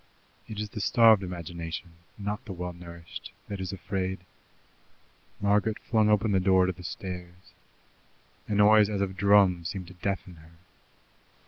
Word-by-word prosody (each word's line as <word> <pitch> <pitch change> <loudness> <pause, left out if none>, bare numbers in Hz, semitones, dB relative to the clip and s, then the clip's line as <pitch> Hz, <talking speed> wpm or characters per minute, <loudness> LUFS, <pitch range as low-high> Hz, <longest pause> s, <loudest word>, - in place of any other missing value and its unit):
It 105 -2 -7
is 105 0 -4
the 105 - -5
starved 110 +1 +6
imagination, 85 -1 -6 0.3
not 105 0 -4
the 95 - -6
well 90 0 -5
nourished, 85 -1 -10 0.2
that 100 -1 -5
is 95 - -4
afraid. 95 -1 -3 1.2
Margaret 105 +2 +2
flung 110 -2 +1
open 105 +1 +3
the 95 - +3
door 95 0 +4
to 95 - 0
the 90 0 -11
stairs. 90 0 -8 0.9
A 105 - -1
noise 105 0 +6
as 100 -2 -1
of 95 -1 -2
drums 95 -4 +4
seemed 95 -2 -5
to - - -12
deafen 95 -1 -4
her. 80 +1 -17
95 Hz, 150 wpm, -28 LUFS, 90-105 Hz, 1.2 s, starved